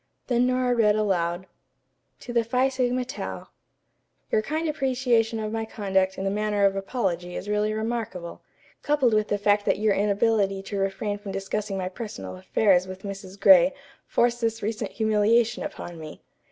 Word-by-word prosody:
Then 245 0 +2
Nora 255 -1 +1
read 215 -3 +3
aloud: 185 -4 0 0.7
"TO 240 - -8
THE 235 -1 +3
PHI 250 +4 +1
SIGMA 255 -1 0
TAU: 255 - -6 0.8
"Your 215 - +3
kind 315 +8 -2
appreciation 250 -5 +1
of 215 0 -3
my 225 0 -2
conduct 190 -3 0
in 190 - -3
the 195 - 0
matter 210 0 +1
of 195 0 +3
apology 190 -4 -2
is - - -5
really 210 +1 +1
remarkable, 220 -6 -4 0.4
coupled 280 -6 +2
with 215 0 +2
the 205 - 0
fact 205 0 +2
that - - +3
your 210 0 +2
inability 200 -1 +1
to 200 0 -4
refrain 195 +1 -2
from 205 -1 -7
discussing 195 +1 -3
my 185 -1 -2
personal 185 - -7
affairs 185 - +2
with 185 0 -9
Mrs. 195 -1 -8
Gray 270 +4 +7 0.3
forced 240 0 +1
this 225 -1 -1
recent 215 +1 -2
humiliation 220 +1 +2
upon 175 - -7
me. 155 -1 -10
210 Hz, 165 wpm, -25 LUFS, 195-235 Hz, 0.8 s, Gray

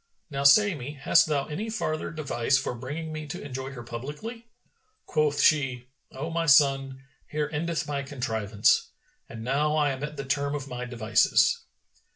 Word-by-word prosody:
Now 140 0 -2
say 205 +8 +6
me, 145 -1 -6
hast 135 +2 +4
thou 145 -3 0
any 200 +9 -4
farther 155 -8 -2
device 140 -5 0
for 135 - -2
bringing 145 +7 -6
me 155 -1 -6
to 145 - -6
enjoy 135 -1 -6
her 120 -3 -8
publicly?" 150 - -7 0.6
Quoth 150 -2 +1
she, 130 -5 +2 0.2
"O 150 +5 -5
my 165 0 -1
son, 135 -2 +4 0.2
here 150 0 -2
endeth 165 +2 -2
my 145 -1 -2
contrivance, 115 -7 +1 0.4
and 115 -1 -8
now 145 +5 +1
I 150 -2 +2
am 135 +1 -5
at 150 0 -5
the 140 - -4
term 140 +1 -1
of 140 -2 -5
my 125 -1 -5
devices." 115 -3 +2
140 Hz, 170 wpm, -27 LUFS, 130-155 Hz, 0.6 s, say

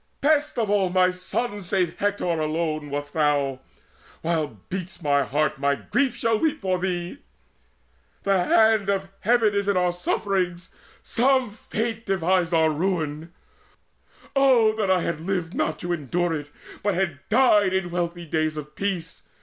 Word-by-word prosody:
Best 300 0 +2
Of 225 -2 +1
all 195 -3 +2
my 185 0 +3
sons, 205 +2 -3
save 180 -3 0
Hector 205 0 0
alone, 155 -2 -1
wast 145 0 -4
thou! 145 -4 +1 0.6
While 155 - -1
beats 185 -1 -5
my 145 -4 +2
heart, 145 +1 0
my 140 0 +2
grief 270 - 0
shall 225 -1 +1
weep 315 -2 0
for 185 -2 0
thee. 180 +5 -3 1.0
The 195 -3 +2
hand 220 -2 +4
of 195 -1 -1
Heaven 230 -3 +3
is 200 0 0
in 200 -2 +2
our 180 -1 +2
sufferings: 180 0 -2 0.3
Some 260 -1 +2
Fate 225 +1 -4
devised 180 -2 +1
our 160 -2 +3
ruin 160 -1 -2 1.0
oh 255 -5 +5
that 215 -3 -1
I 185 -1 +3
Had 165 -2 -2
lived 175 -1 -2
not 155 - -1
to 175 0 -2
endure 170 +3 -1
it, 145 -2 -5 0.3
but 205 -2 0
had 175 -6 -1
died 220 -4 +5
In 190 0 +1
days - - -9
of 175 - -7
wealthy 165 -3 -2
peace! 195 -4 -3
180 Hz, 155 wpm, -24 LUFS, 160-205 Hz, 1.0 s, oh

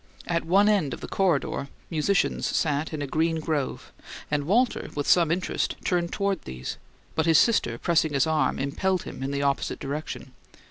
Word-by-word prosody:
At 170 -1 -1
one 195 +5 +4
end 190 -11 +2
of - - -16
the - - -5
corridor 160 -7 0 0.2
musicians 165 +5 +1
sat 150 -1 0
in 150 -2 -3
a - - -1
green 160 +3 0
grove, 155 -4 -3 0.4
and 145 -1 0
Walter, 235 - +1
with 145 -1 -2
some 170 -3 +5
interest, 180 +3 -1
turned 175 -2 +1
toward 200 -3 -1
these; 65 0 -6 0.4
but 160 +1 0
his 165 -1 +6
sister, 165 - +3
pressing 160 +1 +1
his 135 - +3
arm, 160 -1 +1
impelled 175 +7 0
him - - -8
in 135 - -2
the 140 0 -1
opposite 140 -1 0
direction. 140 -1 -5
160 Hz, 180 wpm, -26 LUFS, 140-180 Hz, 0.4 s, his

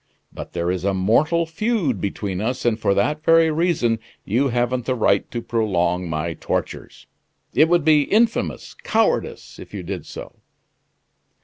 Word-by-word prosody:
But - - -9
there 85 0 -1
is 90 -1 -3
a 100 0 0
mortal 150 - +2
feud 165 - -1
between 100 -1 -3
us, 125 +4 -2
and 115 -2 +1
for 100 -2 +1
that 150 +9 0
very 165 0 +5
reason 155 -9 +1 0.3
you 125 +8 +1
haven't 120 0 -1
the 130 - 0
right 105 -4 +1
to 120 -1 -5
prolong 90 -6 0
my 80 +2 -2
tortures! - - -5 0.5
It 155 +2 +4
would 175 -3 +2
be 150 -2 +5
infamous 225 +2 +1
cowardice 485 0 -1
if - - -11
you - - -5
did - - -6
so. - - -10
120 Hz, 155 wpm, -21 LUFS, 100-160 Hz, 0.5 s, very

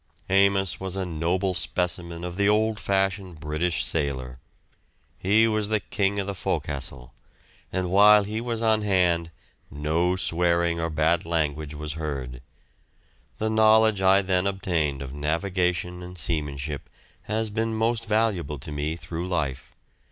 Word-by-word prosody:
Amos 95 -1 +3
was 95 -1 -4
a 95 -1 -1
noble 90 +3 -1
specimen 85 0 -2
of 90 -1 -5
the 100 +1 +2
old 110 +1 +2
fashioned 95 -3 -1
British 75 +4 -1
sailor. 65 -5 -2 0.8
He 110 +4 +4
was 110 -2 0
the 110 -1 +2
king 100 -1 -1
of 100 - -1
the 100 - -3
fo'castle, 70 -9 -3 0.6
and 90 -1 -1
while 105 +2 +7
he 110 +3 -4
was 115 -1 -3
on 110 -1 +3
hand 90 -5 +2 0.4
no 80 +5 0
swearing 85 -1 +1
or 85 0 -1
bad 80 +2 +1
language 80 -2 -2
was 75 0 -5
heard. 70 -6 -5 1.0
The 110 0 -1
knowledge 110 -1 +4
I 95 +1 +5
then 95 0 +1
obtained 80 -8 -1
of 65 0 -8
navigation 90 +3 -1
and 90 0 -9
seamanship 75 -2 -3 0.4
has 110 0 -1
been 110 +1 -1
most 115 +1 0
valuable 105 -9 0
to 70 +3 -8
me 75 +2 -2
through 85 +1 -5
life. 75 -8 -2
90 Hz, 145 wpm, -25 LUFS, 75-100 Hz, 1.0 s, while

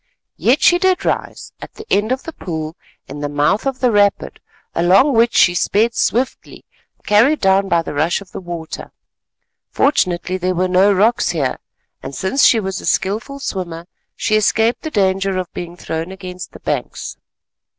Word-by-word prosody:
Yet 260 +5 +2
she 350 0 +5
did 375 0 +1
rise, - - -3
at - - -10
the 435 - -10
end 210 +4 +2
of 260 +1 -1
the 325 - -8
pool 160 - -5 0.3
in 145 +2 -8
the 145 0 -3
mouth 150 - +1
of 265 -1 -3
the 250 -2 +3
rapid, 205 -1 +1 0.3
along 190 - +4
which 230 0 +3
she 175 - +5
sped 215 +6 +1
swiftly, 245 +3 -2 0.4
carried 235 +9 +4
down 195 0 +2
by 170 -2 +2
the - - -6
rush 155 +4 +1
of 200 -3 -14
the - - -7
water. 170 -3 -7 0.8
Fortunately 185 - 0
there 185 0 -1
were 185 +1 +1
no 185 +3 +4
rocks 210 +5 +2
here; 140 -7 -1 0.4
and, 140 - -7
since 200 +9 0
she 230 - +6
was 190 -3 -4
a - - -9
skilful 220 +8 -1
swimmer, 175 -10 -5 0.3
she 215 - 0
escaped 220 +2 +2
the 315 - -4
danger 195 -5 0
of 185 -2 -4
being 175 0 -7
thrown 165 +1 -4
against 185 -2 -9
the - - -11
banks. - - -4
190 Hz, 175 wpm, -18 LUFS, 175-230 Hz, 0.8 s, she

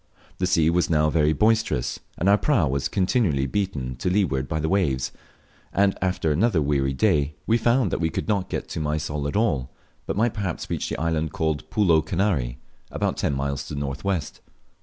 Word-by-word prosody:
The 90 - +1
sea 85 -3 +3
was 90 +1 +1
now 75 -1 +3
very 75 -1 +3
boisterous, 105 - +1 0.2
and 90 - 0
our 100 - +7
prau 115 - +2
was 70 0 -1
continually 95 - +1
beaten 70 -6 -2
to 90 - -1
leeward 85 -9 +1
by 80 +4 -2
the 80 - -1
waves, 75 -10 +1 0.6
and 100 0 +2
after 90 -4 0
another 95 +4 +2
weary 70 -2 +1
day 70 +2 +1
we 115 +1 +2
found 120 -3 +2
w 80 - 0
e - - -3
could 80 - -4
not 100 -4 0
get - - -3
to - - -4
Mysol 75 -1 -2
at 70 - -4
all, 75 - +1 0.4
but - - -2
might 115 +1 +2
perhaps 95 -6 -4
reach - - -2
the - - -3
island 80 -1 -1
called 80 -1 -2
Pulo 90 -6 +3
Kanary, 80 -8 0 0.3
about - - -1
ten 70 - 0
miles 70 0 -2
to - - -5
the - - -3
north 70 -1 -4
west. 90 -7 -2
80 Hz, 200 wpm, -24 LUFS, 70-100 Hz, 0.6 s, our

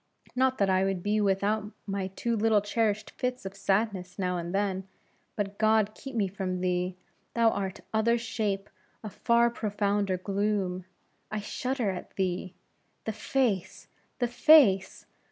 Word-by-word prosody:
Not 260 0 +2
that 200 - +3
I 190 0 +3
would 195 -2 -1
be 210 +1 +1
without 205 +2 +1
my 195 -1 -2
too 230 +5 -2
little 220 -1 +4
cherished 210 0 0
fits 250 -4 -3
of 195 0 -6
sadness 195 -2 -1
now 180 -2 0
and 170 0 -3
then; 195 -1 -1 0.5
but 200 -1 -3
God 215 -1 +3
keep 270 +2 -9
me 205 -4 +2
from 185 -1 -3
thee, 180 0 0 0.4
thou 225 -4 +2 0.2
other 230 +2 +3
shape 215 -4 -2 0.4
of 215 - -7
far 235 0 +3
profounder 205 -3 0
gloom! 195 -1 -1 0.4
I 215 - -2
shudder 250 +1 -2
at 180 - -8
thee! 185 -1 -2 0.5
The 220 - -2
face! 215 -3 -1 0.3
the 245 - +1
face! 245 -6 +5
205 Hz, 145 wpm, -28 LUFS, 190-225 Hz, 0.5 s, face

